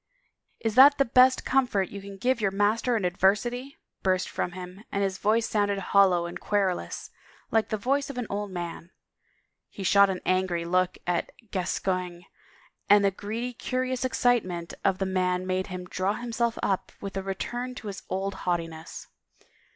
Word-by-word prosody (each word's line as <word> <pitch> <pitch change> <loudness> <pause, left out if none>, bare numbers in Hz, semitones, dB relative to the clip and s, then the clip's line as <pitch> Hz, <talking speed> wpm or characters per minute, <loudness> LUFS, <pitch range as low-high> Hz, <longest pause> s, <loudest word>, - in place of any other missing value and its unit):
" - - -46
Is 225 - +1
that 280 +4 +8
the 275 - +3
best 255 +2 +5
comfort 245 -8 +1
you 200 - -7
can 200 0 -9
give 250 +3 +1
your 200 - +2
master 215 +5 +1
in 205 - -1
adversity? 240 - +1
" - - -59
burst 185 -1 +1
from 175 - -3
him 185 +2 -9
and 200 - 0
his 195 -1 -2
voice 220 +2 +2
sounded 205 -2 +1
hollow 190 -2 +3
and 170 - -6
querulous 185 - -1 0.4
like 225 -1 +2
the 215 - -1
voice 275 +7 0
of 275 - -7
an 245 - -2
old 205 0 -3
man. 175 -2 -6 0.8
He 195 - -8
shot 200 +1 +5
an 185 -1 -2
angry 185 -2 +1
look 180 +1 +1
at 175 -1 -1 0.2
Gascoigne 180 -1 -2 0.7
and 205 0 +6
the 195 - +3
greedy, 225 +6 -4
curious 255 +1 -2
excitement 230 -9 0
of 195 -1 +2
the 195 - -1
man 185 -1 0
made 185 0 -1
him 180 -1 -6
draw 185 +2 -1
himself 235 0 -2
up 190 -2 0
with 195 -1 -6
a 195 - -1
return 240 +6 -4
to 220 - -9
his 200 -1 -6
old 195 +1 -2
haughtiness. 165 -3 -4
195 Hz, 175 wpm, -27 LUFS, 185-230 Hz, 0.8 s, that